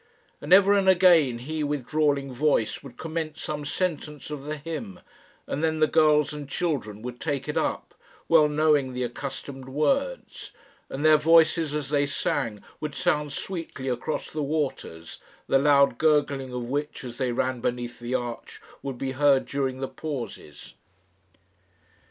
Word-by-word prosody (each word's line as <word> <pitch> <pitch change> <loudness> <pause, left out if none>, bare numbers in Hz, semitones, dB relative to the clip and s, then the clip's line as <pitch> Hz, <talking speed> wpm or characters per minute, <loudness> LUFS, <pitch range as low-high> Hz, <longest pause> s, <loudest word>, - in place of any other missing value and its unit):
And - - -7
ever 200 +2 +7
and 195 -2 +3
anon 170 -9 +5
he 155 +4 -3
with 145 -3 -2
drawling 145 -3 +1
voice 130 -4 +1
would 130 -3 -12
commence 160 -1 -4
some 150 -1 -4
sentence 150 -3 -3
of 145 -2 -6
the 155 +1 -4
hymn, 150 - -6 0.5
and 150 - -3
then 160 -1 +1
the 155 - +4
girls 150 -1 +3
and 145 -2 -7
children 120 - -2
would 125 0 -6
take 140 -3 -3
it 150 - -3
up, - - -2 0.3
well 160 -2 +6
knowing 150 -3 +2
the 125 0 -2
accustomed 135 +2 -6
words; 275 - -1 0.4
and 140 +3 -3
their 155 0 +7
voices 160 -1 +4
as 150 -3 -3
they 145 -1 +2
sang 115 -6 -2 0.2
would 150 -2 -5
sound 150 -5 0
sweetly 165 -5 -5
across 125 +5 -3
the 155 - -3
waters, 140 - -3 0.3
the 135 - +3
loud 140 -3 +4
gurgling 145 -4 +2
of 125 -1 -4
which, 145 +5 -3
as 120 -2 -8
they 125 -1 0
ran 125 0 -1
beneath 120 -1 -3
the 120 +2 -3
arch, 120 -2 -5 0.2
would 135 -2 -5
be 135 +1 -3
heard 135 0 +3
during 135 -2 -2
the 135 - -1
pauses. 125 - -7
145 Hz, 160 wpm, -26 LUFS, 130-155 Hz, 0.5 s, ever